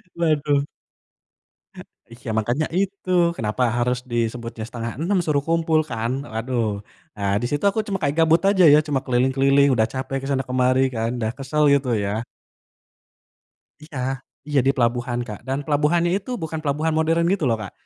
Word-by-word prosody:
Waduh. 150 -4 +1 1.5
Iya, 120 +1 -9
makanya 120 +8 0
itu 195 -1 -3 0.3
kenapa 110 +3 -1
harus 125 +1 +1
disebutnya 115 -1 -3
5.30 125 - -2
suruh 145 -3 0
kumpul 165 -1 +2
kan. 115 +1 -2 0.2
Waduh, 120 +1 -1 0.5
nah, 100 -1 -1
di - - -1
situ 145 +3 -2
aku 200 - -2
cuma 195 -2 -1
kayak 145 +1 0
gabut 165 +1 +4
aja 190 -3 +3
ya. 150 - +8
Cuma 140 -3 0
keliling-keliling, 135 +3 +3
udah 110 -1 +2
capek 135 +1 -3
ke 135 - -6
sana 135 -1 0
kemari 130 +1 +2
kan, 115 +1 -1
udah 110 -1 -1
kesel 145 +2 0
gitu 140 -2 +1
ya. 105 +3 -2 1.6
Iya 150 -4 -8 0.5
iya, 145 -2 +2
di - - +6
pelabuhan, 120 0 0
Kak. 105 -2 -7
Dan 135 +1 -1
pelabuhannya 160 +3 +2
itu 200 - -10
bukan 160 0 -4
pelabuhan 155 +2 -1
modern 165 +1 +2
gitu 195 - -2
loh, 115 - +1
Kak. 100 - -7
135 Hz, 160 wpm, -22 LUFS, 120-155 Hz, 1.6 s, ya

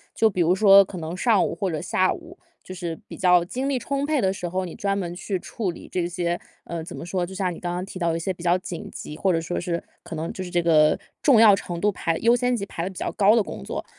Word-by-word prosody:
就 225 - +4
比 185 -4 0
如 170 +2 +4
说 200 0 +8
可 190 -1 -9
能 165 +1 -5
上 210 0 +3
午 - - -3
或 195 -3 -2
者 155 - -2
下 185 +1 +1
午， 345 +1 -12 0.3
就 185 - -8
是 170 -3 -5
比 - - -8
较 180 -2 +4
精 260 +9 -3
力 270 -2 0
充 280 +2 -2
沛 300 -1 +1
的 190 -2 +2
时 180 -2 -5
候， 185 +2 -2
你 175 - -8
专 200 0 -1
门 175 -3 -4
去 190 +1 -3
处 195 +1 -3
理 - - -11
这 175 -2 0
些， 175 -1 -2 0.3
呃， 170 -1 -5
怎 160 - -8
么 - - -7
说， 180 0 -1
就 185 - -10
像 190 -2 -1
你 - - -10
刚 175 - -2
刚 180 +1 -3
提 195 - -9
到 170 -2 +1
的 165 - -1
一 - - -4
些 185 +3 -2
比 175 - -12
较 175 +1 +3
紧 180 -2 -7
急， 150 - -8
或 190 +3 +2
者 165 - +1
说 170 +2 -3
是 170 -1 -2 0.2
可 - - -7
能 160 +2 -3
就 185 - -5
是 180 - -7
这 175 -1 +2
个 155 -2 +4 0.2
重 265 -7 +6
要 215 -3 +8
程 175 -3 -5
度 210 - +2
排 165 -2 -1
优 235 +1 +4
先 245 0 +1
级 210 - -3
排 170 - -5
得 180 - -2
比 190 - -12
较 - - -2
高 205 +1 +5
的 230 - +4
工 - - -6
作。 - - -5
185 Hz, 320 characters per minute, -24 LUFS, 170-200 Hz, 0.3 s, 说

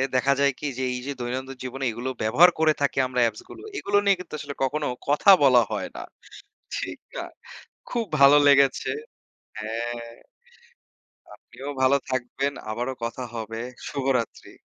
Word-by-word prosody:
দেখা 135 +2 +3
যায় 140 0 +4
কি - - -6
যে, 130 - -2
এই 125 - -3
যে, - - -2
দৈনন্দিন 130 +2 -4
জীবনে 130 +1 -5
এগুলো 120 +4 -4
ব্যবহার 125 +12 +6
করে 160 -1 +4
থাকি 140 -1 0
আমরা 125 0 -2
apps 110 -1 -6
গুলো, - - -11 0.2
এগুলো 205 - +1
নিয়ে 200 -1 +5
কিন্তু 180 - -10
আসলে 145 -1 -6
কখনো 145 +3 -1 0.2
কথা 145 +7 +3
বলা 130 -3 +7
হয় - - -2
না। - - -6 0.8
ঠিক - - -5 0.2
না? - - -3 0.7
খুব 235 -2 -1
ভালো 140 +1 +8
লেগেছে। 140 -1 +4 0.7
হ্যাঁ, 115 +2 -4 1.3
আপনিও 135 +2 -11
ভালো 130 +2 +5
থাকবেন। 130 +2 -1 0.2
আবারো 120 +4 -2
কথা 115 +2 -4
হবে। 115 0 -5 0.3
শুভরাত্রি। 135 -4 -2
130 Hz, 150 wpm, -25 LUFS, 120-140 Hz, 1.3 s, ভালো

